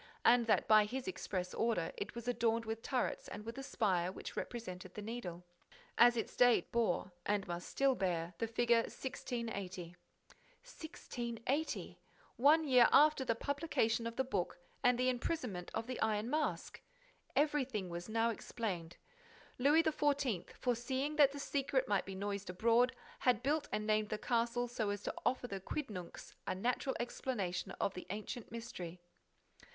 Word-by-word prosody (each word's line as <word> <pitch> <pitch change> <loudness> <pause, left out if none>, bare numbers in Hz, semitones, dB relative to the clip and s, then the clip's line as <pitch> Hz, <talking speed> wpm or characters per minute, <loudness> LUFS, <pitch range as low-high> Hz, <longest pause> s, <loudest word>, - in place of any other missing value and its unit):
and 235 -1 +6
that, 215 - +3
by 215 -1 +7
his 250 +4 -4
express 185 0 -3
order, 220 -8 0
it 200 - -5
was 235 0 -6
adorned 230 -1 +1
with 225 0 -3
turrets 255 0 -1
and 210 - -7
with 230 +1 -5
a - - -5
spire 185 -9 +1
which - - -8
represented 185 -6 -6
the 210 - -5
Needle. 200 -6 -5 0.5
As 240 0 +6
its 225 - -3
date 245 -1 +6
it - - -7
bore, 215 -5 +1 0.2
it 205 -1 +1
must 175 0 -4
still 275 -1 +3
bear, 175 -5 -1
the 230 - 0
figure 235 +1 +3
1680. 205 -9 -5 0.7
1680! 275 - -4 0.4
One 300 +6 +5
year 250 -3 +7
after 300 -2 +6
the 230 -3 +1
publication 240 -4 0
of 230 - -5
the 265 - +1
book 250 -9 -2 0.3
and 245 -1 +5
the 255 +1 +2
imprisonment 250 - -2
of 225 - -1
the 255 +1 -5
Iron 220 +2 +1
Mask! 305 0 -1 0.5
Everything 270 -9 +1
was 175 +3 -6
now 225 +1 +2
explained: 185 -7 -4 0.6
Louis 295 +5 +5
XIV., 285 - +1
foreseeing 260 +4 -1
that 285 -2 +7
the 285 - -7
secret 275 -2 0
might 200 -3 +1
be 195 - -5
noised 200 0 -3
abroad, 235 +7 +3 0.2
had 245 -1 +2
built 290 +2 +1
and 210 0 -1
named 215 0 +2
that 215 - -4
castle 240 0 +1
so 230 -3 -2
as 205 0 -3
to - - -2
offer 255 0 0
the 195 -4 -4
quidnuncs 200 - -6
a - - 0
natural 250 +6 0
explanation 235 -6 -2
of 195 - +1
the 180 - -8
ancient 215 +4 -5
mystery. 185 -7 -6
230 Hz, 160 wpm, -36 LUFS, 200-255 Hz, 0.7 s, by